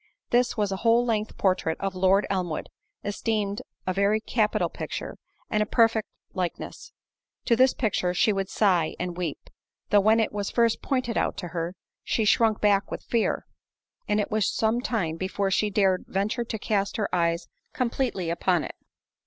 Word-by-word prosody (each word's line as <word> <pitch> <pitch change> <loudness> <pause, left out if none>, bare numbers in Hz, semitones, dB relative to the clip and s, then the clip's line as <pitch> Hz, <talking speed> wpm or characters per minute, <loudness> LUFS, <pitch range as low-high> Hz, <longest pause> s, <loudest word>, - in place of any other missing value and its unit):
This 245 0 +2
was 205 -2 +1
a 195 - -1
whole 230 +3 +3
length 220 -2 -1
portrait 185 -4 +1
of 195 -1 -2
Lord 190 +2 +3
Elmwood, 180 -5 -2 0.3
esteemed 205 0 -1 0.2
a 185 - 0
very 200 +3 +2
capital 220 -1 +1
picture, - - -6 0.3
and 215 - 0
a - - +2
perfect 225 -2 +3 0.3
likeness—to 185 +5 -4
this 255 +2 +4
picture 200 -6 0
she 205 +4 +3
would 195 -1 -2
sigh 180 -7 +2
and 180 -1 -3
weep; 170 -4 -3 0.5
though 205 - +7
when 215 +3 +4
it 220 - 0
was 205 -1 -2
first 235 -2 +2
pointed 255 -4 0
out - - -1
to 175 -3 -5
her, 170 +1 -3 0.3
she 220 - 0
shrunk 220 0 +3
back 200 -2 +3
with - - -6
fear, 230 -2 0 0.6
and 210 0 +2
it 205 - -2
was 215 -2 +1
some 225 +2 +1
time 180 -11 -1
before 195 +2 -1
she 210 +2 +2
dared 190 -2 +2
venture 215 +5 -1
to 220 - -4
cast 200 -1 -1
her 210 - 0
eyes 170 -1 +1 0.3
completely 235 -8 -1
upon 175 0 +1
it. - - -6
205 Hz, 170 wpm, -26 LUFS, 185-225 Hz, 0.6 s, though